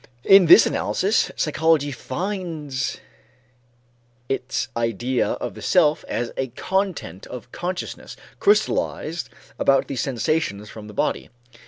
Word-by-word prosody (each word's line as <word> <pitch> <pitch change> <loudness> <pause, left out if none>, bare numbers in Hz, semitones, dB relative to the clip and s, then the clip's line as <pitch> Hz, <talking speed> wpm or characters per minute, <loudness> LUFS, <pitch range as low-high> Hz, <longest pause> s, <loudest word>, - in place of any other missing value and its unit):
In 195 -2 +7
this 170 - +9
analysis, 200 +3 +1
psychology 155 -2 +2
finds 155 - -4 1.3
its 135 -1 -2
idea 115 +2 0
of - - -5
the - - -11
self 155 -5 +3
as 120 0 -2
a 135 - -1
content 180 - -3
of 125 0 -9
consciousness 175 0 -5 0.2
crystallized 175 - +1 0.3
about 135 -1 +3
the 140 - -4
sensations 120 -4 -1
from 105 -1 -10
the 105 - -11
body. - - -1
145 Hz, 115 wpm, -23 LUFS, 120-175 Hz, 1.3 s, this